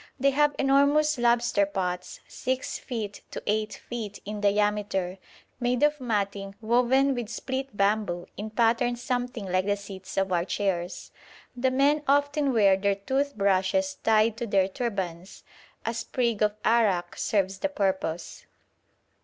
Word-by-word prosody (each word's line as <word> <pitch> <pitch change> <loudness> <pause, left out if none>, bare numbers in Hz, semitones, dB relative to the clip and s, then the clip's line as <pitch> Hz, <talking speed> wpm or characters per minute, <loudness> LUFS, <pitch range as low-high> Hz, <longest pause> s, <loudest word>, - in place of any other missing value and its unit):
They 275 +2 +4
have 295 +1 +2
enormous 280 +1 +3
lobster 235 -4 +3
pots, 180 -2 -4
6 260 0 -3
feet 215 -5 -5
to - - -7
8 215 +1 0
feet 225 -4 -5
in 210 0 -5
diameter, 205 -2 0 0.4
made 245 +2 +1
of 295 -1 +2
matting 200 -4 -2
woven 250 +4 +3
with 240 -4 -4
split 260 0 -4
bamboo, 200 -3 +1
in 210 +3 -5
patterns 235 +2 +1
something 245 -3 -2
like 185 +1 0
the 205 0 +1
seats 195 -2 -9
of 195 -1 +1
our 175 -1 +2
chairs. 180 -1 -2 0.4
The 255 +1 +1
men 280 +3 +3
often 285 0 +2
wear 205 -5 +5
their 200 0 +1
tooth 270 +8 -1
brushes 200 +9 +2
tied 220 0 +3
to 235 0 -3
their 195 -2 +3
turbans; 190 -5 -4 0.4
a 230 - -1
sprig 230 -1 -1
of 210 -1 +2
arrack 205 -7 +2
serves 195 -2 0
the 290 - 0
purpose. 190 - -2
215 Hz, 145 wpm, -27 LUFS, 195-255 Hz, 0.4 s, wear